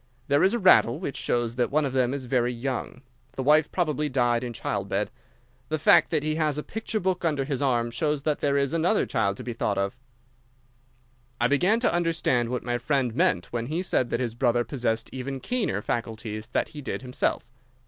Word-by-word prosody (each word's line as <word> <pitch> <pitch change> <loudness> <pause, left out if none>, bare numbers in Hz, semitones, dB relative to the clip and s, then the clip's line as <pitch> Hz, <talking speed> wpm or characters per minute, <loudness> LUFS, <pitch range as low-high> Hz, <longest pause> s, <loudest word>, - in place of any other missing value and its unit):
There 140 +1 +4
is 195 +5 +4
a - - +1
rattle, 180 - +5
which 145 -7 -4
shows 120 0 -1
that 125 - +1
one 150 +1 +1
of 135 - -3
them 130 -2 +2
is 135 -2 -4
very 125 -1 +1
young. 125 +1 -4 0.3
The 130 - -4
wife 150 +2 +4
probably 150 -4 0
died 120 -2 +1
in 125 - -4
childbed. 100 -2 -2 0.6
The 155 - 0
fact 155 - +5
that 155 -3 0
he 155 0 0
has 155 -2 +1
a 150 - -3
picture 225 0 -3
book 185 -2 -1
under 150 -5 0
his 140 -2 -2
arm 120 -4 +1
shows 150 +3 -1
that 150 -1 0
there 140 -1 +1
is 140 0 0
another 170 +6 +2
child 100 -6 0
to - - -7
be 120 - -4
thought 105 -2 -1
of." 100 0 -1 1.4
I 120 - +3
began 180 - +3
to 245 - +2
understand 165 -8 +1
what 125 -1 -3
my 120 0 -1
friend 130 -2 0
meant 90 -3 +1
when 120 -1 -2
he 165 +6 -2
said 130 -9 +1
that - - -1
his 120 -3 -2
brother 120 0 +2
possessed 115 -4 -2
even 135 +1 -4
keener 200 - -1
faculties 110 -2 -4
that - - -1
he 150 - -9
did 135 - -4
himself. 125 -2 -2
130 Hz, 210 wpm, -26 LUFS, 120-155 Hz, 1.4 s, rattle